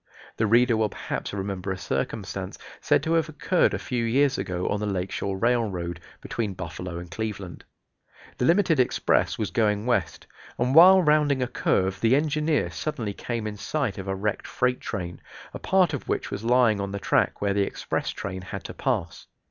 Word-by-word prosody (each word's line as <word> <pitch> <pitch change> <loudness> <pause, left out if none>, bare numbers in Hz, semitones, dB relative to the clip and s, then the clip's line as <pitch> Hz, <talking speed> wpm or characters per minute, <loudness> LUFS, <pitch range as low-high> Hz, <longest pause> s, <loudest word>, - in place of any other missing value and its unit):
The 110 - +2
reader 120 +2 +4
will 110 -1 +1
perhaps - - -5
remember 95 -1 -3
a 95 - -3
circumstance 70 -8 -4 0.2
said - - +2
to 160 - 0
have 165 -1 +2
occurred 155 +4 +1
a - - -1
few 125 -2 -2
years 135 +4 +2
ago 90 0 -2
on 100 - 0
the 105 - -2
Lake 95 -2 -2
Shore 100 -1 -2
Railroad, 95 -7 0 0.2
between 105 -5 -3
Buffalo 90 0 -6
and 85 0 -8
Cleveland. 100 -3 -5 0.7
The - - +2
limited 170 -2 +3
express 125 - +2
was - - -2
going 105 -1 +1
west, 100 -10 -1 0.3
and 125 +2 +1
while 185 +4 +8
rounding 150 -3 +3
a - - -1
curve 95 -5 0
the 115 +3 +4
engineer 150 - +1
suddenly 110 - -3
came 115 +1 -4
in 105 -1 -4
sight 125 -4 -2
of 95 - -6
a 95 - -1
wrecked 105 +2 -2
freight 125 0 0
train, 90 -5 -5 0.3
a - - -6
part 185 -4 +2
of 145 - -5
which - - -2
was 100 - -4
lying 115 -3 +3
on 100 0 -3
the - - -2
track - - +1
where 100 -1 0
the 100 - +1
express 100 - -2
train 95 +1 -5
had 100 +1 -7
to - - -7
pass. 95 -12 -2
110 Hz, 190 wpm, -25 LUFS, 95-130 Hz, 0.7 s, while